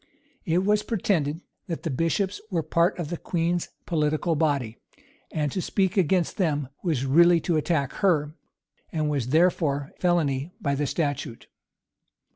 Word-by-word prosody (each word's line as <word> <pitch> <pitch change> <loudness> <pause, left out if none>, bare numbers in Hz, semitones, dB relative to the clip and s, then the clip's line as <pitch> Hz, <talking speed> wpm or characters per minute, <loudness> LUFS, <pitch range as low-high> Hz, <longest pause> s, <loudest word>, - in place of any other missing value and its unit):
It 180 +1 +1
was 210 +1 +3
pretended, 170 -8 -1 0.3
that 165 -2 -4
the 165 - -2
bishops 185 +8 0
were 170 -5 -1
part 170 +4 +2
of 170 -4 -4
the 175 - -2
queen's 170 +1 -1 0.2
political 155 0 0
body; 140 -7 0 0.5
and 150 -3 -1
to 185 - -2
speak 190 +1 0
against 180 -2 +1
them, 150 -7 0
was 155 -8 0
really 170 +5 +5
to 170 - 0
attack 150 -3 0
her, 155 -6 +1 0.6
and 155 -2 -1
was 135 -5 -1
therefore 150 -2 +2
felony 160 -3 +1
by 140 - 0
the 145 +1 -1
statute. 145 -7 -3
160 Hz, 145 wpm, -26 LUFS, 145-175 Hz, 0.6 s, really